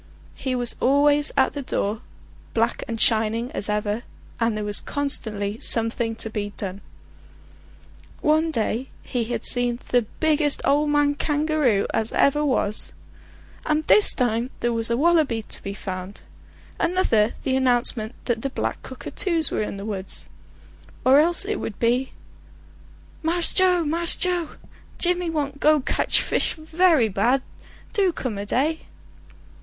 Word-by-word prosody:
He 260 -2 -3
was 245 -2 +1
always 290 +2 +3
at 265 - +3
the 285 - -5
door, 215 -3 -2 0.5
black - - 0
and 230 -1 -5
shining 225 +2 +1
as 205 - -3
ever, 210 +1 -1 0.4
and 230 -2 0
there 210 - -3
was 205 0 +1
constantly 220 -7 -1
something 225 0 +4
to 225 - -4
be 205 -1 -4
done. 195 0 -6 1.4
One 315 +2 +2
day 235 -2 -2
he 240 -2 -3
had 235 0 -4
seen 245 -1 +4
the 245 -3 +1
biggest 305 -2 +2
ole 295 +2 +2
man 290 -1 +2
kangaroo 295 -7 0
as 225 0 -1
ever 295 +2 +2
was; 235 -7 -1 0.7
and 305 0 0
this 425 - +6
time 240 -1 0
there 240 0 0
was 230 0 0
a 235 - 0
wallaby 300 -7 +2
to - - -3
be 200 0 -6
found; 185 0 -7 0.6
another 285 - +1
the 260 -1 0
announcement 245 -3 +1
that 235 -2 -1
the 275 - -2
black - - -4
cockatoos 335 -6 -2
were - - -1
in 210 - -4
the 200 - -7
woods; 190 - -2 0.8
or 265 +2 +6
else 340 +4 +4
it 425 +1 -2
would 210 - -6
be: 245 +3 0 1.1
"Mass 335 +2 0
Joe, 365 -2 +4
Mass 335 +3 +1
Joe! 355 -3 -2 0.4
Jimmy 355 -1 0
want 285 -3 -3
go 305 +1 +4
kedge 255 - +1
fis - - -1
very 320 -4 +2
bad; 235 +7 +1 0.5
do 395 -5 +2
come 245 -10 -5
a 205 - -6
day." 300 +8 -1
255 Hz, 150 wpm, -23 LUFS, 220-305 Hz, 1.4 s, this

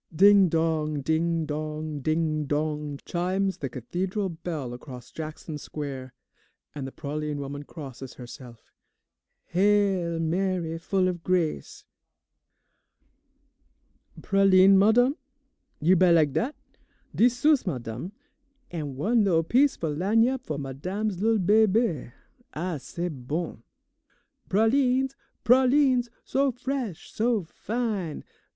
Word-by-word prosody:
Ding 195 +2 +6
dong, 155 -2 0
ding 160 +2 0
dong, 155 0 -4
ding 155 +1 0
dong, 150 0 -2
chimes 185 +2 -1
the 135 - -3
Cathedral 185 - -3
bell 160 -7 -5
across 125 -1 -10
Jackson 155 -1 -7
Square, 135 -4 -6 0.6
and 140 -3 -5
the - - -8
praline 150 +1 -4
woman 140 0 -5
crosses 135 -4 -9
herself. 120 -2 -11 0.9
"Hail, 190 -3 +2
Mary, 170 0 -1
full 185 +2 +1
of 175 -2 -3
grace 175 -4 -1 2.4
"Pralines, 195 -1 +5
madame? 240 +8 +4 0.6
You 175 +5 +4
buy 185 0 +5
lak' 155 -4 +4
dat? 255 - -1 0.6
Dix 245 +2 +4
sous, 290 -3 +3
madame, 125 - -4 0.6
an' 150 -6 -4
one 215 - +2
lil' 170 -5 +3
piece 265 - +3
fo' 160 -3 -3
lagniappe 225 - +2
fo' 150 - -4
madame's 180 +9 -3
lil' 225 +1 +3
bebe. 205 - +2 0.4
Ah, 170 0 -2
c'est 170 +5 -5 0.2
bon! 160 -5 -3 0.9
"Pralines, 255 +5 +2 0.3
pralines, 255 0 +4 0.2
so 275 0 +1
fresh, 250 - -4
so 225 -2 +1
fine! 205 -2 -3
175 Hz, 110 wpm, -26 LUFS, 150-210 Hz, 2.4 s, Ding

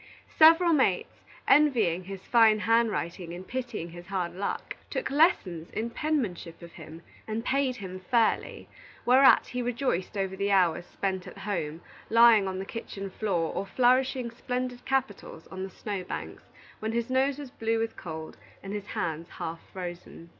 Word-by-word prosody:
Several 330 +2 +7
mates, 260 - +1 0.3
envying 220 - +4
his 195 0 -8
fine 225 -3 +5
handwriting 210 -6 0
and 185 +1 -9
pitying 240 -9 -4
his 175 +1 -11
hard 185 -3 -2
luck, 195 +3 -4
took - - -3
lessons 210 - +2
in 230 +2 -3
penmanship 225 - -2
of 170 - -10
him 160 0 -11 0.2
and 220 +2 -3
paid 270 -2 +1
him 185 -5 -7
fairly, 235 -2 +1 0.4
whereat 260 +3 +6
he 250 - -3
rejoiced 240 -6 -2
over 190 -1 -1
the 200 +1 -1
hours 180 -3 +2
spent 190 -2 -3
at - - -10
home, 170 -6 -3 0.3
flat 230 -2 +6
on 190 0 -3
the 190 - -4
kitchen 195 -3 -6
floor, 180 -6 -1
or - - -2
flourishing 255 +1 +2
splendid 250 +1 -4
capitals 255 -11 -2
on 190 - -6
the 190 - -4
snow 195 0 -5
banks, 80 - -6 0.4
when 220 +1 -3
his 235 +1 -2
nose 265 +1 +2
was 285 -3 -8
blue 225 -1 -1
with 225 0 -2
cold 160 -2 -7 0.3
and 195 +1 -6
his 205 -1 -5
hands 165 0 -3
half 165 +1 -6
frozen. 175 -2 -8
205 Hz, 160 wpm, -28 LUFS, 180-245 Hz, 0.4 s, Several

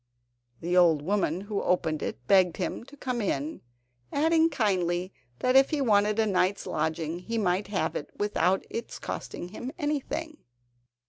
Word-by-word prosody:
The 175 +2 -1
old 165 -5 +5
woman 185 -1 0
who 205 0 -3
opened 160 -4 0
it 120 - -5
begged 185 -1 +4
him 185 - -3
to 290 +2 -15
come 250 -3 -2
in, 155 -6 -2 0.5
adding 320 +2 +3
kindly, 185 - 0 0.3
that 255 +1 +2
if 270 0 +7
he 305 - -1
wanted 210 -4 +3
a 225 - +3
night's 195 -1 +1
lodging 160 +1 -2
he 230 +5 -4
might 195 -1 +1
have 170 -5 -1
it - - -4
without 195 -2 +1
its 230 - -5
costing 175 - -6
him 245 +6 -6
anything. 300 +1 -3
200 Hz, 155 wpm, -28 LUFS, 175-240 Hz, 0.5 s, if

